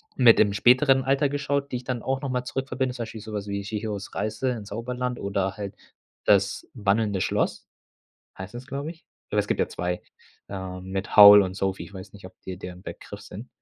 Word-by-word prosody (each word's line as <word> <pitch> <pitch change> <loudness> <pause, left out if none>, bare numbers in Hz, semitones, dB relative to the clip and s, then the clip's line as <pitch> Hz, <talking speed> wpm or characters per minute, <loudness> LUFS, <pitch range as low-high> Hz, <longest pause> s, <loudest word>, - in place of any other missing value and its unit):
mit 120 -3 +6
dem 100 -2 +4
späteren 130 +5 +4
Alter 140 +2 +2
geschaut, 140 0 -2
die 125 - -1
ich 125 - -9
dann 125 -2 -3
auch 135 +1 -2
noch 140 - -3
mal 125 0 -1
zurück 135 +1 -3
verbinde. 130 0 -1
Zum 120 - -3
Beispiel 110 -1 -8
so 110 0 -9
was 105 -1 -4
wie 100 0 -3
„Chihiros 105 -1 -5
Reise 110 +4 -1
ins 105 -4 -6
Zauberland“ 125 +3 -3
oder 100 0 -2
halt 100 -2 -6 0.5
„Das - - +2
wandelnde 105 -2 +1
Schloss“. - - -1 0.7
Heißt 95 +4 -8
das, 125 +3 -8
glaube 140 +3 -4
ich? 165 - -18 0.3
Aber - - +2
es - - 0
gibt - - -1
ja - - +2
2, 90 0 -3 0.5
ähm, 95 -1 -6
mit 95 0 -3
Howl 105 0 +11
und 95 0 -4
Sophie. 95 -1 -2
Ich - - -13
weiß 95 0 -10
nicht, 100 -2 -12
ob 95 - -14
dir 95 -1 -7
der 90 -1 -7
'n 90 - -14
Begriff - - -9
sind? - - -10
110 Hz, 220 wpm, -25 LUFS, 100-125 Hz, 0.7 s, Howl